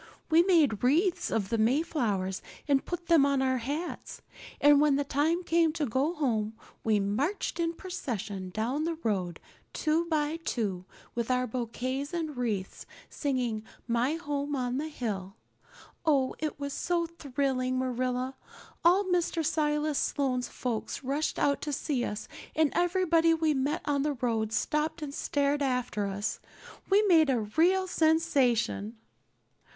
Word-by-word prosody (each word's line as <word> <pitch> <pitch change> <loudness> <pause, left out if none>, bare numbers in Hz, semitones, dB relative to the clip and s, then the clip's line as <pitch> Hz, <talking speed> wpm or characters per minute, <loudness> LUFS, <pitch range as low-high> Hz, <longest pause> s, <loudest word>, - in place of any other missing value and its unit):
We 325 +2 +7
made 325 - +3
wreaths 335 +9 +2
of 200 -4 -1
the 230 - 0
Mayflowers 220 - 0 0.3
and 275 -2 +3
put 350 -1 -5
them 330 -4 +5
on 280 -1 +2
our 260 -1 +1
hats; 290 +9 -5 0.4
and 290 0 +6
when 295 -2 +4
the 285 - +1
time 310 +6 +1
came 335 -2 +3
to 310 -2 -1
go 270 +8 0
home 225 -8 0 0.3
we 215 -2 +3
marched 265 - -1
in 335 0 0
procession 220 - -5
down 235 +10 -1
the 335 0 -1
road, 185 -6 -1 0.3
two 320 +2 +1
by 310 -1 0
two, 210 - -3 0.3
with 235 0 -2
our 255 0 +2
bouquets 255 +5 -3
and 315 -4 -3
wreaths, 215 -6 -3 0.2
singing 250 -6 -1 0.3
'My 240 +5 +1
Home 290 -3 -3
on 250 0 -1
the 305 - -2
Hill.' 205 -9 -4 0.7
Oh, 280 -5 +2
it 305 -2 -3
was 280 -1 -4
so 345 -1 0
thrilling, 270 -5 -1
Marilla. 255 0 -1 0.5
All 360 +4 +5
Mr. 350 -3 0
Silas 300 -1 +1
Sloane's 255 -3 0
folks 240 +1 -4
rushed 280 +4 -1
out 280 0 +1
to 295 - -3
see 275 -2 -1
us 210 -2 -4 0.3
and 310 -2 +3
everybody 340 -2 +3
we 320 -1 +2
met 285 +5 -1
on 285 -1 +1
the 295 +1 0
road 225 -4 -1
stopped 300 +6 -1
and 280 -2 -5
stared 285 0 0
after 250 -6 0
us. 200 +2 -3 0.5
We 400 +2 +5
made 330 -7 +5
a 250 -4 +2
real 340 - +2
sensation." 270 - +1
280 Hz, 150 wpm, -29 LUFS, 240-320 Hz, 0.7 s, We